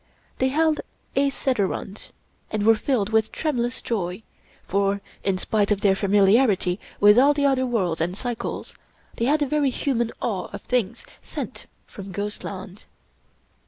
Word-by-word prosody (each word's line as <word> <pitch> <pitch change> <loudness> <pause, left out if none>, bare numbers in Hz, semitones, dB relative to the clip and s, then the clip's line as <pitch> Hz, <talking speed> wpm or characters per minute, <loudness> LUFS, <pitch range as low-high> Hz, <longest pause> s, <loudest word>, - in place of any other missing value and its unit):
They 260 - +3
held 310 +3 +2 0.3
a 275 +1 +3
sederunt, 210 -6 -2 0.4
and 210 -1 -1
were 225 - +7
filled 220 -2 0
with 220 -1 +2
tremulous 250 -5 -2
joy, 185 -2 -3 0.4
for, 200 +1 +1 0.2
in 195 -2 +1
spite 205 +2 0
of 205 -1 +1
their 195 -2 +4
familiarity 200 -1 +3 0.2
with 210 +3 +7
all 285 +3 +5
the 285 -1 +1
other 260 -2 +2
worlds 185 -9 0
and 180 +3 -1
cycles, 240 -1 -4 0.4
they 230 - 0
had 295 +3 +3
a - - -1
very 295 -1 +2
human 240 -3 -1
awe 200 -6 -2
of - - -7
things 250 - -1 0.2
sent - - -7 0.2
from 195 -1 -10
ghostland. 200 0 -6
220 Hz, 150 wpm, -24 LUFS, 195-260 Hz, 0.4 s, were